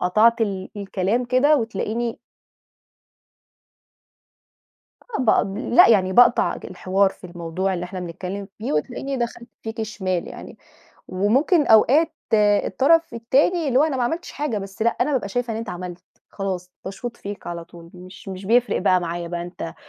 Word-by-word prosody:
قطعت 225 +6 +3
ال 195 -3 -2
الكلام 200 +4 -1
كده 260 +5 +4
وتلاقيني 225 0 -2 2.8
آه، 450 - -4
بق 220 - +4 0.3
لأ 355 - +8
يعني 190 -4 +3
باقطع 245 +3 +5
ج - - -10
الحوار 190 +1 +1
في 190 - -17
الموضوع 175 +2 -3
اللي 175 0 -3
إحنا 185 +1 -6
بنتكلم 185 +3 -6
فيه، 220 - -3
وتلاقيني 270 - -2
دخلت 235 -1 -4
فيكِ 225 0 -4
شمال 190 -5 -3
يعني. - - -10 0.5
وممكن 260 - +2
أوقات 275 +9 +5 0.2
الطرف 250 +10 +3
التاني 280 +8 +1
اللي 260 -1 +3
هو - - +5
أنا 305 -4 0
ما 250 - +1
عملتش 325 +8 -3
حاجة، 290 -7 -2
بس 195 +1 -8
لأ، 235 - +4
أنا 300 - +1
بابقى 255 -7 -1
شايفة 245 +1 -2
إن - - -3
أنت 225 0 -5
عملت، 180 0 -7 0.3
خلاص، 185 -2 -4
باشوط 235 +5 -6
فيك 205 0 -8
على 170 -1 -5
طول 170 -1 -14
مش 185 +3 -13
مش 190 0 -7
بيفرق 240 +4 +3
بقى 185 -2 +4
معايا 170 0 -4
بقى 170 0 -4
أنت 175 -1 -7
205 Hz, 160 wpm, -22 LUFS, 185-245 Hz, 2.8 s, لأ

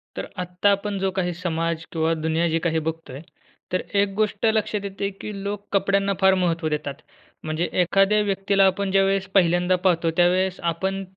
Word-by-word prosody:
तर - - -5
आत्ता 180 +3 0
आपण 200 0 -1
जो 195 0 0
काही 180 -2 -1
समाज 165 -1 -2
किंवा 160 0 +1
दुनिया 160 +1 0
जी 165 +1 +1
काही 165 -1 0
बघतोय 160 -4 -5 0.5
तर 185 - +1 0.2
एक 200 -1 -1
गोष्ट 215 0 0
लक्षात 220 -1 +1
येते 200 0 -3
की 215 - -5
लोक 200 0 -4
कपड्यांना 200 0 +2
फार 190 0 +6
महत्त्व 170 -3 0
देतात. 150 -2 -3 0.5
म्हणजे 155 +2 -2
एखाद्या 195 +4 +3
व्यक्तीला 195 0 +2
आपण 190 +1 +1
ज्यावेळेस 195 0 +2
पहिल्यांदा 175 -1 +3
पाहतो, 175 -2 +1
त्यावेळेस 180 +1 +2
आपण 190 +4 -2
185 Hz, 165 wpm, -23 LUFS, 165-195 Hz, 0.5 s, फार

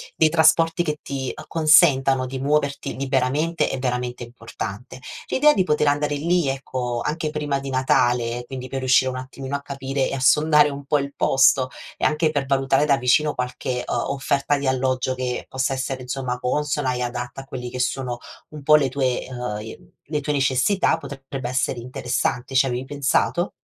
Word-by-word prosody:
dei 160 - +4
trasporti 165 +1 +3
che 150 -3 -3
ti 135 -2 -4
acconsentano 135 -4 +4
di 130 +1 -5
muoverti 140 0 -1
liberamente 135 +5 0
è 135 - -3
veramente 125 -1 -2
importante. 120 0 -8 0.3
L'idea 300 +3 +4
di 190 - +2
poter 150 -3 +1
andare 145 0 +1
lì, 170 +1 +1
ecco, 125 -3 -3
anche 155 0 -2
prima 145 -2 -2
di 140 - -6
Natale, 120 -2 +1
quindi 130 -1 -6
per 135 - -3
riuscire 130 0 +3
un 130 - -5
attimino 130 +1 -6
a - - -12
capire 135 -1 -2
e - - -5
a - - -4
sondare 150 +1 +5
un 140 0 -7
po' 150 +1 +2
il 140 0 -5
posto 135 -1 +3 0.3
e - - -1
anche 155 +1 +2
per 145 -3 -1
valutare 135 +1 +2
da 140 -2 +3
vicino 135 +4 +2
qualche, 125 0 -3
uhm, - - -1 0.2
offerta 140 +1 0
di 140 - -3
alloggio 130 0 0
che 125 -1 -3
possa 130 +1 -1
essere, 130 0 -3
insomma, 125 0 -3
consona 145 0 -1
e 125 - -3
adatta 120 +2 -4
a 135 - -14
quelli 125 -2 -6
che 125 - -6
sono 125 -1 -2 0.3
un 150 -1 -10
po' 150 +2 +6
le 135 -3 +1
tue 130 -2 -1
uhm, 110 -4 -6 0.2
le 150 -2 0
tue 150 +1 -1
necessità 135 +8 +2
potrebbe 135 -4 -7
essere 130 -1 -1
interessante. 125 +1 -2
Ci 135 +1 +5
avevi 125 +1 -3
pensato? 145 +6 0
135 Hz, 180 wpm, -22 LUFS, 125-145 Hz, 0.3 s, po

